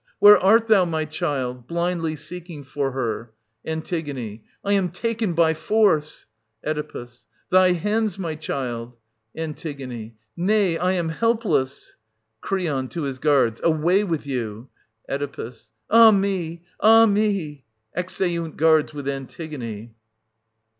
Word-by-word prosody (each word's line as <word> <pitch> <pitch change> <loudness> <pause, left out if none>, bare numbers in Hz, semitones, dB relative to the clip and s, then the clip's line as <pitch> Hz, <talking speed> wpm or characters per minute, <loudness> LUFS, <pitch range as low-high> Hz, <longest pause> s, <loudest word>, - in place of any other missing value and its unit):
Where 205 +1 +8
art 220 +4 +5
thou, 215 -4 +5
my 160 -2 -1
child? 135 -6 -3
{blindly 170 -2 -1
seeking 160 0 -8
for 140 0 -2
her). 120 -3 -3 0.3
An. 160 0 -3 0.8
I 200 - +2
am 195 -3 +2
taken 220 +2 -2
by 165 -1 +3
force 160 -3 +1 0.2
— 110 +1 -27
Oe. 150 -5 -3 0.5
Thy 185 0 +6
hands, 210 +2 0
my 170 -5 -3
child! 125 -6 -5 0.2
— 110 0 -46
An. 160 -2 -4 0.8
Nay, 190 -1 +2
I 180 +2 +1
am 170 -3 -1
helpless. 165 - -1 0.4
Cr. 195 - -1 0.3
{to 170 - -5
his 135 -2 -4
guards). 135 -6 +2
Away 170 +5 +3
with 165 -7 -2
you! 120 -3 -4 0.4
Oe. 140 -4 -4 0.4
Ah 225 0 +9
me, 190 -5 0 0.2
ah 225 +1 +7
me! 200 - 0 0.3
[Exeunt 170 -2 -2
guards 155 -1 +3
with 140 -2 -6
Antigone. 130 -5 -6
160 Hz, 125 wpm, -23 LUFS, 140-190 Hz, 0.8 s, Ah